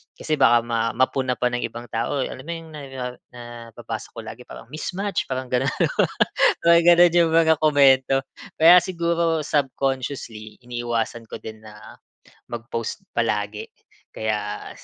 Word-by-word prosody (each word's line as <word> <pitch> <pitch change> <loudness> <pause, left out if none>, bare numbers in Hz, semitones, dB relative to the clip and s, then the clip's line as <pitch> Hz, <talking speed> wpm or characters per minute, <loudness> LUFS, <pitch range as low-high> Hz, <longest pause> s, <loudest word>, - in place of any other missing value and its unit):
Kasi 155 - -2
baka 120 0 +6
ma 115 -1 0
mapuna 130 0 +1
pa 125 - +2
ng 120 0 -2
ibang 120 +1 -6
tao, 115 +5 -1
alam 130 - -7
mo 165 - -6
'yong 165 -1 -7
na, 150 - -7 0.2
ah, 125 -1 -4 0.6
nababasa 110 -1 -7
ko - - -7
lagi 120 +2 -9
parang - - -11
mismatch 190 +6 -3
parang 130 0 -3
gano'n, 125 - +1 0.9
parang 170 0 +6
ganun 175 0 +6
yung 170 -1 +4
mga 160 -1 +5
komento. 135 -3 +4 0.4
Kaya 175 +3 +8
siguro 170 -2 0
subconsciously, 130 -6 -3
iniiwasan 120 -1 -3
ko - - -6
din 110 -1 -9
na 105 -1 -13 0.6
mag-post 115 -1 -5 0.2
palagi 105 -3 -1 0.5
kaya 105 -1 -3
130 Hz, 140 wpm, -23 LUFS, 115-160 Hz, 0.9 s, Kaya